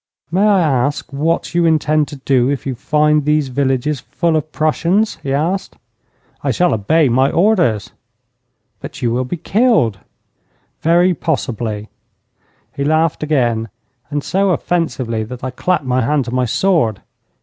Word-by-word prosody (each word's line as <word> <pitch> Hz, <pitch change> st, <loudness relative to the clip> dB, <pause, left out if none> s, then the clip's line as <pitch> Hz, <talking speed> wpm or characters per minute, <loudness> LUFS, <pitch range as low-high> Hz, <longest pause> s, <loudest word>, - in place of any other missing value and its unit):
'May 195 Hz, +5 st, +3 dB
I 200 Hz, -3 st, +4 dB
ask 140 Hz, -2 st, 0 dB
what 160 Hz, +5 st, -1 dB
you 170 Hz, -1 st, +3 dB
intend 155 Hz, -1 st, +2 dB
to 150 Hz, -, -8 dB
do 130 Hz, -2 st, +1 dB
if 140 Hz, -5 st, -2 dB
you 135 Hz, -, -2 dB
find 150 Hz, +4 st, +1 dB
these 150 Hz, -1 st, +1 dB
villages 135 Hz, +2 st, 0 dB
full 165 Hz, +5 st, -1 dB
of 155 Hz, 0 st, -2 dB
Prussians?' 170 Hz, +7 st, 0 dB
he 135 Hz, -, -4 dB
asked. 165 Hz, +8 st, -1 dB, 0.7 s
'I -, -, 0 dB
shall 180 Hz, -1 st, +2 dB
obey 145 Hz, +9 st, +2 dB
my 130 Hz, +3 st, +3 dB
orders.' 170 Hz, -, +1 dB, 0.9 s
'But -, -, -9 dB
you 120 Hz, -, +1 dB
will 125 Hz, +2 st, -1 dB
be 175 Hz, -, -4 dB
killed.' 180 Hz, -, +2 dB, 0.8 s
'Very 175 Hz, +3 st, +3 dB
possibly.' 115 Hz, -10 st, -3 dB, 0.9 s
He 140 Hz, -, -2 dB
laughed 155 Hz, +2 st, +1 dB
again, 120 Hz, -7 st, 0 dB, 0.4 s
and 145 Hz, 0 st, -2 dB
so 195 Hz, +1 st, +1 dB
offensively 150 Hz, -11 st, -1 dB
that 120 Hz, +3 st, -9 dB
I 130 Hz, -, -3 dB
clapped 175 Hz, +3 st, -1 dB
my 130 Hz, 0 st, +1 dB
hand 140 Hz, +2 st, +1 dB
to 120 Hz, -, -6 dB
my 130 Hz, 0 st, +1 dB
sword. 125 Hz, -, +1 dB
150 Hz, 150 wpm, -17 LUFS, 125-165 Hz, 0.9 s, I